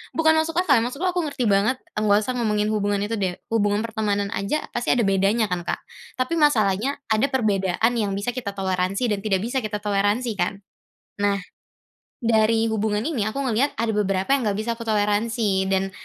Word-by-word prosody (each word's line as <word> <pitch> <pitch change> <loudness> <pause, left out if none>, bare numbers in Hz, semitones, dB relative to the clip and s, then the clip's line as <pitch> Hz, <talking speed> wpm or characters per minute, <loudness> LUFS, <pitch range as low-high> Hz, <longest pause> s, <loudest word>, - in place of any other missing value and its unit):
bukan 320 -1 +4
masuk 320 +1 0
akal, 315 -7 +4
maksudku 280 +10 -2
aku 355 -1 0
ngerti 270 -4 -2
banget, 205 +6 +2 0.2
nggak 210 -1 +3
usah 255 +2 -3
ngomongin 210 -2 +1
hubungan 205 -1 0
itu 225 +2 -2
deh, 185 -2 -1 0.2
hubungan 205 -2 +2
pertemanan 210 -3 -1
aja 200 +11 -2
pasti 240 - 0
ada 240 -2 +3
bedanya 200 +3 +2
kan, 180 -2 -3
Kak? - - -2 0.4
Tapi 255 +6 0
masalahnya 235 -3 +2
ada 220 +5 +2
perbedaan 210 -2 +1
yang 210 -3 0
bisa 205 +5 -2
kita 230 -6 -3
toleransi 190 +4 -1
dan 200 - 0
tidak 195 -3 +1
bisa 245 +3 -1
kita 210 -1 -3
toleransi 205 +4 +1
kan? 195 +3 -1 0.6
Nah 200 -1 +2 0.8
dari 225 -1 +2
hubungan 210 -1 0
ini 260 -11 -1
aku 220 - -3
ngelihat 260 +3 +1
ada 230 -1 +1
beberapa 195 -2 0
yang 265 - -1
nggak 200 - -3
bisa 230 +2 -1
aku - - -5
toleransi 210 -1 +1
dan 190 0 0
215 Hz, 185 wpm, -23 LUFS, 200-240 Hz, 0.8 s, bukan